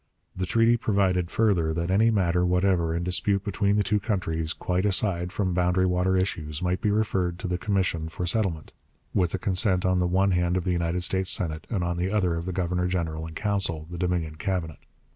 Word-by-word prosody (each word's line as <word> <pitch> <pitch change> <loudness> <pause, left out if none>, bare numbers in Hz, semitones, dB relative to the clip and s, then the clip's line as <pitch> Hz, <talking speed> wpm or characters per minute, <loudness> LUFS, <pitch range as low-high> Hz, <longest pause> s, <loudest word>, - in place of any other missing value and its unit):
The 95 0 -3
treaty 115 +4 +3
provided, 95 -5 +1
further, 90 -9 +1
that 85 +2 -2
any 110 +4 +4
matter 90 -5 +1
whatever 90 -2 +1
in 85 - -2
dispute 100 +2 0
between 100 0 0
the 105 - +2
two 105 +1 +1
countries, 80 -7 -2
quite 90 +1 -1
aside 95 -3 +1
from 95 -2 -1
boundary 90 +1 +2
water 90 +1 +1
issues, 75 -5 -2
might 90 0 -1
be 105 - +1
referred 95 -5 0
to 95 +1 -5
the 90 0 -2
commission 90 -6 -1
for 90 +2 -4
settlement, 85 -5 -1 0.4
with 90 -3 +2
the - - 0
consent 95 -3 +1
on 95 0 +2
the 90 - +1
one 95 +2 +2
hand 90 0 +1
of 90 - -1
the 90 - -1
United 85 0 -1
States 95 0 +1
Senate, 80 -4 0
and 100 -6 -1
on 85 0 -2
the 90 +2 -1
other 95 -4 +1
of 85 +1 -4
the - - -1
Governor 90 0 -1
General 80 -3 -2
in 80 - -10
Council 95 -6 -1
the 90 - -6
Dominion 85 -3 -1
Cabinet. 85 -3 -3
90 Hz, 210 wpm, -26 LUFS, 85-95 Hz, 0.4 s, any